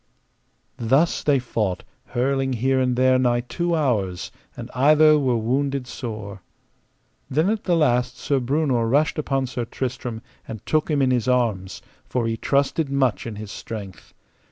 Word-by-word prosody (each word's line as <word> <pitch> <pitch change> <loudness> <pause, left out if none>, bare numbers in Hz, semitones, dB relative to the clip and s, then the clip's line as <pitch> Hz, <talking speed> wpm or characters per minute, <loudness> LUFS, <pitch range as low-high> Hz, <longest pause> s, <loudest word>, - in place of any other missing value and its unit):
Thus 135 +9 +2
they 145 -2 +3
fought, 110 -7 -2 0.2
hurling 135 +1 0
here 130 +3 +1
and 125 -1 +1
there 130 +1 +4
nigh 120 -1 +2
two 170 +7 -2
hours, 105 - -1 0.3
and - - -8
either 150 +3 +5
were 130 -4 +1
wounded 135 +4 -1
sore. 105 -6 -7 0.9
Then 155 +9 +2
at 220 -1 -3
the 175 - +2
last 125 -5 +1
Sir 140 -2 0
Breunor 130 -2 +1
rashed 150 +4 +2
upon 135 -3 0
Sir 125 -1 -4
Tristram 120 -1 -5 0.2
and 110 -3 -8
took 155 +1 +1
him 145 -3 +2
in 130 - +2
his 125 -2 0
arms, 110 -7 0 0.2
for 125 -2 -2
he 115 0 0
trusted 140 +5 0
much 135 -5 0
in 115 - -5
his 105 -1 -8
strength. 100 -4 -8
130 Hz, 155 wpm, -23 LUFS, 115-140 Hz, 0.9 s, either